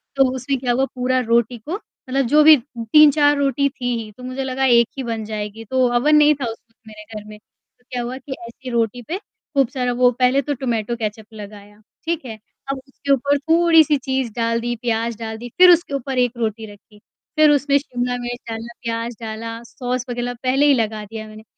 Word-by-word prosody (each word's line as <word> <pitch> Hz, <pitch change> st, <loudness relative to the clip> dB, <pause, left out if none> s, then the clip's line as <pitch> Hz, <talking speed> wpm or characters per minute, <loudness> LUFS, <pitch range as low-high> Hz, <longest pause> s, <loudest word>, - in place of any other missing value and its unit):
तो 270 Hz, -1 st, +5 dB
उसमें 260 Hz, +1 st, -2 dB
क्या 245 Hz, -1 st, -1 dB
हुआ, 265 Hz, +2 st, +2 dB
पूरा 255 Hz, +1 st, +1 dB
रोटी 235 Hz, +1 st, +2 dB
को 320 Hz, -, -5 dB, 0.3 s
मतलब, 270 Hz, +1 st, +1 dB
जो 300 Hz, +4 st, +5 dB
भी 310 Hz, 0 st, +9 dB, 0.4 s
3-4 290 Hz, -1 st, +6 dB
रोटी 280 Hz, 0 st, +1 dB
थी 255 Hz, -2 st, -9 dB, 0.2 s
ही, 215 Hz, -, -11 dB
तो 250 Hz, +5 st, -15 dB
मुझे 255 Hz, +1 st, -4 dB
लगा 265 Hz, 0 st, -1 dB
एक 235 Hz, -2 st, +5 dB
ही 265 Hz, -, -3 dB
बन 230 Hz, -2 st, -3 dB
जाएगी। 215 Hz, +1 st, -5 dB
तो 260 Hz, -1 st, +3 dB
अवन 300 Hz, +5 st, +4 dB
नहीं 300 Hz, 0 st, +6 dB
था 245 Hz, -, 0 dB
उस 225 Hz, -, -9 dB
वक़्त 230 Hz, -, -38 dB
मेरे 215 Hz, -1 st, -11 dB
घर 210 Hz, -, -6 dB
में। 210 Hz, -, -10 dB, 0.5 s
क्या 250 Hz, -1 st, -2 dB
हुआ 250 Hz, +2 st, -5 dB
कि 265 Hz, +1 st, -7 dB
ऐसी 255 Hz, +2 st, -10 dB
रोटी 235 Hz, 0 st, 0 dB
पे 360 Hz, -, -2 dB
खूब 275 Hz, -, -3 dB
सारा 250 Hz, -2 st, -1 dB
वो 245 Hz, 0 st, +4 dB
पहले 255 Hz, +2 st, +3 dB
तो 290 Hz, +1 st, -2 dB
टमाटो 235 Hz, -3 st, -2 dB
केचप 215 Hz, -1 st, -5 dB
लगाया, 205 Hz, 0 st, -12 dB, 0.2 s
ठीक 330 Hz, -2 st, -2 dB
है। 225 Hz, -3 st, -6 dB, 0.4 s
अब 275 Hz, -, -3 dB
उसके 280 Hz, +1 st, -4 dB
ऊपर 280 Hz, +2 st, +2 dB
थोड़ी-सी 325 Hz, -1 st, +4 dB
चीज़ 265 Hz, -3 st, -2 dB
डाल 230 Hz, 0 st, 0 dB
दी, 240 Hz, +1 st, -2 dB
प्याज़ 230 Hz, -1 st, -1 dB
डाल 220 Hz, -1 st, -5 dB
दी, 240 Hz, +2 st, -8 dB
फिर 365 Hz, 0 st, +9 dB
उसके 340 Hz, -4 st, +2 dB
ऊपर 270 Hz, -1 st, -3 dB
1 245 Hz, -2 st, +2 dB
रोटी 225 Hz, -1 st, -2 dB
रखी। 210 Hz, +1 st, -20 dB, 0.4 s
फिर 310 Hz, 0 st, +6 dB
उसमें 285 Hz, 0 st, +3 dB
शिमला 245 Hz, -3 st, -3 dB
मिर्च 245 Hz, 0 st, -5 dB
डाला, 225 Hz, +1 st, -6 dB
प्याज़ 230 Hz, 0 st, -3 dB
डाला, 230 Hz, +1 st, -6 dB
सॉस 250 Hz, +1 st, -4 dB
वग़ैरह 245 Hz, 0 st, -3 dB
पहले 265 Hz, +3 st, +3 dB
ही 290 Hz, -, +6 dB
लगा 220 Hz, -3 st, -1 dB
दिया 220 Hz, +1 st, -8 dB
मैंने। 215 Hz, 0 st, -12 dB
245 Hz, 210 wpm, -20 LUFS, 230-275 Hz, 0.5 s, भी